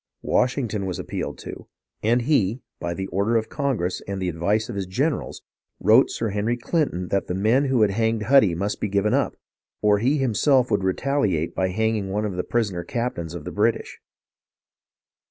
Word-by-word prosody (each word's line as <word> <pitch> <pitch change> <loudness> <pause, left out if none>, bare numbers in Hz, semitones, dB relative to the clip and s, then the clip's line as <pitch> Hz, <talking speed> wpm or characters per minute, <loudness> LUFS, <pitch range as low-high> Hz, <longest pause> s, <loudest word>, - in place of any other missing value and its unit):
Washington 120 -6 0
was 90 - -3
appealed - - -4
to; - - -9 0.3
and 120 +3 +2
he, 120 -4 +1 0.2
by 85 0 -3
the 95 - -3
order 100 +4 0
of 110 - -2
Congress 125 - -1
and 100 -1 -3
the 90 -1 -1
advice 95 +6 0
of - - -6
his 95 -2 -3
generals, 140 - -2 0.4
wrote - - +5
Sir 115 - -2
Henry 105 +4 -1
Clinton 120 - -1
that 100 - 0
the 90 - -2
men 110 +8 +3
who 130 -5 +3
had 105 - +3
hanged 110 +1 0
Huddy 110 -7 +5
must 100 +4 -3
be - - 0
given 100 +1 +1
up, - - +1 0.4
or 105 -1 +3
he 130 +7 +2
himself 130 0 +2
would 100 -2 +1
retaliate 95 - 0
by 95 - 0
hanging 110 0 0
one 105 +2 -1
of 100 -3 -3
the 90 - -1
prisoner 105 -7 -1
captains 90 -6 -3
of 80 -3 -7
the - - -5
British. - - 0
105 Hz, 185 wpm, -24 LUFS, 95-120 Hz, 0.4 s, wrote